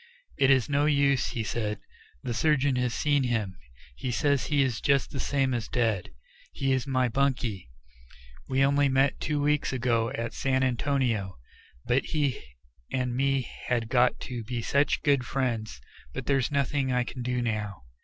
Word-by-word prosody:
"It 135 - +3
is 130 -3 +4
no 145 0 +2
use," 140 -3 +3
he 115 - -3
said; 105 -1 -2 0.4
"the 120 - -2
surgeon 140 +2 +2
has 125 -1 0
seen 145 +3 +1
him; 115 -7 -1 0.4
he 125 - -4
says 140 +3 +1
he 145 -2 +3
is 125 -4 -2
just 140 -1 +2
the 135 - -5
same 135 -2 0
as 120 -3 -2
dead. 115 -7 0 0.4
He 135 -1 -1
is 130 -1 0
my 130 -2 +2
bunkie; 120 - -1 0.8
we 135 +1 +3
only 140 0 +3
met 135 +1 +2
two 150 -1 -1
weeks 150 0 +1
ago 120 -3 +1
at 115 -3 -3
San 130 -1 0
Antonio; 125 - 0 0.5
but 125 +2 +2
he 145 -5 -1 0.5
and 125 -2 -1
me 135 -1 +1 0.2
had 115 -2 0
got 125 0 +3
to 120 -2 -5
be 120 +1 -4
such 140 +4 +1
good 140 -4 +3
friends 115 - -2 0.4
But 135 - -4
there's 135 -3 +1
nothing 140 -1 0
I 125 0 +2
can 125 +1 -7
do 125 0 -1
now." 105 - -3
130 Hz, 170 wpm, -27 LUFS, 120-140 Hz, 0.8 s, is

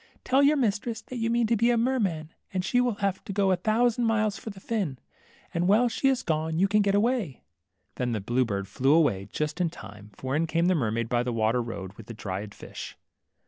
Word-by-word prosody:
Tell 265 +2 +3
your 290 +2 +5
mistress 225 -2 0
that 255 - -8
you 230 0 0
mean 235 0 +2
to 230 +1 +2
be 230 +2 +3
a 240 - +3
mer 255 +3 +1
man, 165 -6 -2 0.2
and 185 -1 -2
she 245 +4 +2
will 245 -3 +1
have 190 -1 -1
to - - -5
go 195 -1 +2
a - - +4
thousand 230 +5 +1
miles 215 -2 +1
for - - -7
the 200 -2 -9
fin, 190 - -2 0.6
and 170 +1 +1
while 220 +5 +5
she 255 +4 0
is 265 -1 +2
gone 160 0 -1
you 190 +3 +4
can 210 +1 +3
get 200 -1 +2
away." 210 - 0 0.5
Then 125 -1 -1
the 110 - -1
blue 120 +6 +1
bird 100 -4 -3
flew 135 +9 +3
aiway, 100 -8 -1
just 150 +3 -2
in 175 - +2
time; 105 -8 -11
for 130 +1 -3
in 165 +2 +1
came 165 +1 +1
the 185 - +4
mermaid 115 -7 0
by 120 0 +1
the 125 0 -2
water 115 +1 +1
road, 100 -5 -6
with 115 - -12
the 115 - -8
dried 100 0 -5
fish. - - -9
180 Hz, 240 wpm, -27 LUFS, -, 0.6 s, your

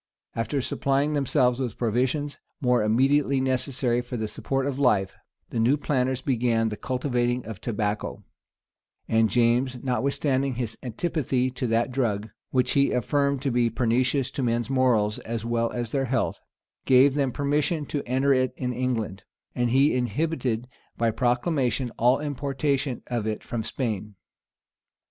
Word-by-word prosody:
After 115 +4 -1
supplying 140 +4 0
themselves 130 -3 +2
with 125 -6 -3
provisions 130 +5 -1 0.2
more 125 -2 +2
immediately 135 +5 +3
necessary 130 -1 0
for 120 0 -6
the 110 -1 -2
support 135 +5 -2
of 140 -1 -2
life, 105 -8 +2 0.4
the 115 - -1
new 125 +6 +3
planters 130 -3 0
began 115 -3 +1
the 105 - -4
cultivating 125 0 -1
of 110 -2 -8
tobacco; 105 -2 -2 0.8
and 110 -1 +3
James, 125 +2 +2
notwithstanding 135 0 0
his 115 -3 -3
antipathy 130 0 -1
to 125 0 -3
that 115 +3 +1
drug, 110 -5 -1 0.2
which 125 -1 +1
he 140 0 +3
affirmed 140 +3 0
to 135 - +1
be 120 -1 +2
pernicious 125 +3 +1
to - - -3
men's 120 0 0
morals, 120 -6 +2
as 115 -1 -5
well 115 0 0
as 120 -2 -3
their 135 -1 0
health,[*] 130 0 -1 0.4
gave 130 +1 +6
them 140 -2 +1
permission 145 +3 0
to 145 +1 -3
enter 135 +3 +3
it 130 -1 +1
in 125 -1 -2
England; 115 -6 -2 0.3
and 120 -1 0
he 135 +5 +4
inhibited 125 -1 -1 0.3
by 115 -1 +2
proclamation 125 +1 0
all 125 +3 +4
importation 140 -2 -1
of 120 -3 -2
it 110 -1 -3
from 120 - -3
Spain. 105 -4 -3
125 Hz, 150 wpm, -26 LUFS, 115-135 Hz, 0.8 s, gave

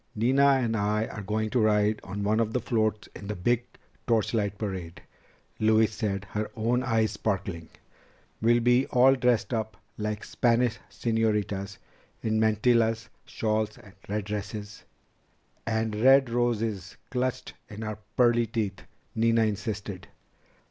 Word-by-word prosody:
"Nina 130 +6 +4
and 120 -4 +1
I 105 +1 +1
are 110 - -7
going 110 +2 -2
to 125 - +2
ride 105 -1 +3
on 100 +1 -5
one 105 +2 +2
of 110 -1 0
the 125 - +1
floats 110 -3 -1
in 100 - -8
the 105 - -3
big 120 +6 +1 0.4
torchlight 110 -3 +1
parade," 95 -5 -5 0.6
Louise 110 0 +3
said, 100 -2 -2
her 105 0 -2
own 120 +3 +1
eyes 110 -4 +1
Sparkling. 95 -6 -3 0.7
"We'll 120 +2 +4
be 125 +2 +3
all 130 +2 +5
dressed 125 -2 +1
up 110 -1 -2 0.2
like 105 0 -3
Spanish 120 -1 +1
señoritas, 105 -4 -1 0.5
in 110 -1 +1
mantillas, 110 +1 +2 0.2
shawls, 110 -1 -1 0.3
red 105 -1 -2
dresses 105 0 -6 0.4
..." - - -41
"And 110 -1 0
red 130 +3 +5
roses 115 -5 -1
clutched 130 0 -2 0.2
in 110 0 -7
our 110 -1 -5 0.2
pearly 120 -1 +4
teeth," 105 -4 -3 0.3
Nina 115 0 +3
insisted. 105 -2 -3
110 Hz, 135 wpm, -27 LUFS, 105-115 Hz, 0.7 s, all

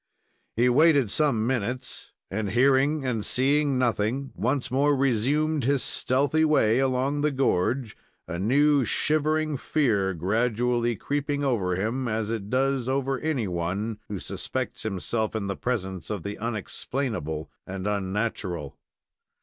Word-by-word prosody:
He 120 +2 +3
waited 140 -3 +4
some 135 -8 +2
minutes, 125 +1 -2 0.2
and, 105 +1 -2
hearing 135 +5 +3
and 115 -5 -1
seeing 140 +3 +2
nothing, 125 +2 0
once 135 -1 -1
more 145 +2 +3
resumed 140 +4 +1
his 140 0 +2
stealthy 145 +5 +1
way 130 -7 +3
along 135 +2 +1
the 150 - +3
gorge, 130 -3 0 0.3
a 85 - -4
new, 140 +7 +3
shivering 155 +3 +1
fear 105 -11 +1
gradually 120 +6 +1
creeping 145 +4 -2
over 100 -10 +1
him, 115 +7 -1
as 110 -1 -1
it 105 -3 -4
does 130 0 +1
over 135 0 0
anyone 105 - -2
who 100 - -3
suspects - - -4
himself 110 +2 -2
in 110 -2 -2
the 100 0 -2
presence 95 -7 -3
of 105 -6 -3
the 100 0 -5
unexplainable 110 - -3 0.2
and 95 0 -5
unnatural. 100 -5 -2
125 Hz, 130 wpm, -26 LUFS, 105-140 Hz, 0.3 s, waited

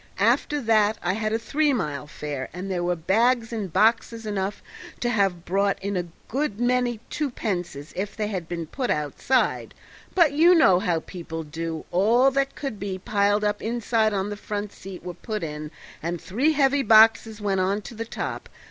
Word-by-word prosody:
After 295 - +2
that 215 -2 +3
I 180 +1 +1
had 215 +1 -1
a 225 - +2
three 290 +6 +1
mile 150 - -3
fare, 145 -3 -5
and 185 +2 -5
there 175 -2 -1
were 175 0 +1
bags 225 +7 +2
and 205 -6 -3
boxes 225 +3 +2
enough 205 -1 -3 0.4
to 240 - 0
have 195 -6 +1
brought 195 +2 +1
in 200 +1 -3
a 175 -1 -2 0.2
good 260 -4 -2
many 245 -1 +1
twopences 180 - -3
if 200 +4 -4
they 215 - 0
had 185 -5 -4
been 170 -2 -3
put 250 - -3
outside; 150 - 0 0.4
but 335 -6 +5
you 335 +5 +6
know 195 - +6
how 170 -3 0
people 165 -3 -7
do; 160 +1 -5
all 230 +9 +4
that 275 0 0
could 270 -8 -5
be 195 -1 -3
piled 205 +2 +1
up 210 0 0
inside 225 -1 +1
on 200 0 -1
the - - -3
front 205 0 -5
seat 190 -2 -10
were 180 0 -5
put 215 0 -5
in 150 -1 -5 0.3
and 170 +1 -3
three 250 - +1
heavy 280 -1 +3
boxes 220 -1 +5
went 200 -2 0
on 200 +3 0
the 230 -1 -5
top. - - -5
205 Hz, 185 wpm, -25 LUFS, 180-235 Hz, 0.4 s, you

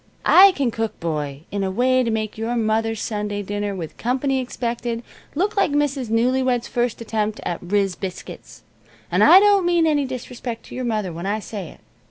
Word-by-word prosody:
I 390 +1 +8
can 275 -7 0
cook, 225 -1 -3
boy, 150 -4 -3
in 200 -1 -2
a 190 - 0
way 255 +6 +2
to 240 - 0
make 215 -1 -2
your 225 +2 -2
mother's 225 -1 0
Sunday 210 -1 -3
dinner, 205 0 -3
with 165 -4 -7
company 265 +2 0
expected, 240 -2 -3 0.3
look 395 +7 0
like 395 - +3
Mrs. 285 -4 0
Newlywed's 245 +1 +1
first 240 -1 -1
attempt 215 -1 -2
at 170 - -3
'riz' 195 +1 0
biscuits. 190 -2 -8 0.5
And - - +3
I 370 - +9
don't 405 -1 +4
mean 345 -1 +3
any 295 -3 +2
disrespect 250 -2 -6
to - - -12
your 255 0 -3
mother 215 -6 -2
when 170 +3 -5
I 205 +2 0
say 205 -4 -6
it. - - -16
230 Hz, 190 wpm, -22 LUFS, 205-260 Hz, 0.5 s, I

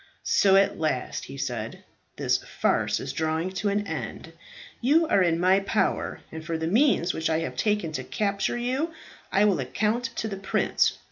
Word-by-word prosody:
"So, 195 -1 +4
at 195 -3 +3
last," 155 -6 -2
he 135 - -9
said, 120 -5 -4 0.3
"this - - +1
farce - - 0
is - - -5
drawing 160 +3 -1
to 200 +2 -1
an 205 +1 0
end. 160 -1 -6 0.5
You 300 +7 +4
are 200 - +3
in 170 -2 +2
my 185 +2 +4
power, 200 +2 -1
and 160 0 -7
for 165 0 -2
the 160 - -3
means 195 - +3
which 160 0 -1
I 160 0 +1
have 125 - -4
taken 210 +2 0
to 130 -4 -4
capture 200 - -1
you, 265 +7 -1 0.4
I 200 +2 +4
will 200 -6 +3
account 215 - 0
to 220 - -2
the 195 -3 -5
prince. 190 0 +1
190 Hz, 185 wpm, -26 LUFS, 160-210 Hz, 0.5 s, So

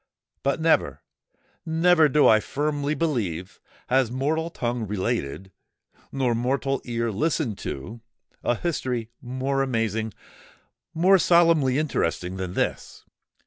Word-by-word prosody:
But 140 +3 0
never—never, 160 0 +1
do 150 +2 +4
I 110 - +6
firmly 145 +4 -2
believe, 100 - -2 0.3
has 130 -1 +2
mortal 150 +6 -1
tongue 120 -7 -3
related, 95 - -3 0.6
nor 130 -3 0
mortal 130 +3 -1
ear 115 -1 -1
listened 130 - -1
to, 110 - -6 0.4
a 120 - +1
history 125 -7 -3
more 130 +2 -2
amazing—more 125 - -1
solemnly 165 -7 +4
interesting, 95 - -1
than 95 -1 -5
this. - - -3
130 Hz, 105 wpm, -25 LUFS, 110-155 Hz, 0.6 s, I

